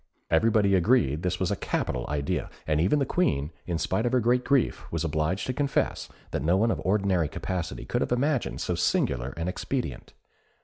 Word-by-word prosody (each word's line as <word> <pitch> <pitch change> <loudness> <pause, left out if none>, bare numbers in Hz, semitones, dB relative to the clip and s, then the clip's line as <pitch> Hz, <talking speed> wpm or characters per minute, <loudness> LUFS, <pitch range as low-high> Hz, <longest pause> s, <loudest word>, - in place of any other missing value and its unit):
Everybody 105 +3 +4
agreed 90 - +3
this 90 0 -1
was 95 +1 0
a - - +1
capital 60 -8 -2
idea, 70 -1 -1 0.2
and 75 0 +1
even 95 - +3
the 140 - +1
Queen, 75 - 0 0.2
in 85 -2 -1
spite 95 +8 0
of 120 - -2
her 130 - +5
great 125 +2 +2
grief, 140 -2 +1
was - - -1
obliged 80 +4 -1
to 130 - -2
confess 140 +1 -1 0.2
that - - -2
no 85 +4 +3
one 115 +3 +3
of - - -2
ordinary 95 -4 +2
capacity 90 -3 -4
could - - -1
have - - -1
imagined 130 0 0
so - - -1
singular - - +1
an 85 +1 -2
expedient. 90 - -4
95 Hz, 190 wpm, -27 LUFS, 80-120 Hz, 0.2 s, her